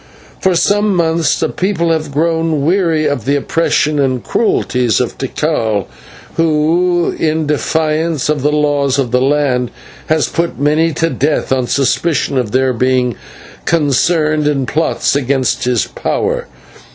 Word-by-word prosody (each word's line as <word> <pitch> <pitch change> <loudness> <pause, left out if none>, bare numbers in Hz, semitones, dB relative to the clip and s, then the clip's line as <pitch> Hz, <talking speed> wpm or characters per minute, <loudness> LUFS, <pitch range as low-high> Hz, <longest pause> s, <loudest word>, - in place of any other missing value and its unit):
For 190 -1 +1
some 205 +3 +2
months 165 -3 +1
the - - +1
people 180 -3 -1
have 155 -2 -1
grown 160 -1 0
weary 165 -3 +1
of 140 -7 -1
the 140 - +1
oppressions 150 0 0
and 130 -3 0
cruelties 125 - 0
of - - -2
Tikal, 105 -4 -1 0.5
who 165 +2 +1
in 155 0 0
defiance 155 0 0
of 150 -2 0
the 150 +2 +1
laws 145 -2 +1
of 130 -4 -1
the 125 +1 +2
land 135 -3 +1 0.4
has 155 -1 +1
put 170 0 -2
many 155 +3 +2
to 165 +2 0
death 150 -1 -1
on 130 -2 +1
suspicion 140 +1 0
of 120 -4 -2
their 130 +1 +1
being 125 -1 +1 0.5
concerned 155 0 +1
in 140 -3 0
plots 155 +1 0
against 135 -2 0
his 125 -4 +1
power. - - -2
150 Hz, 140 wpm, -15 LUFS, 130-165 Hz, 0.5 s, some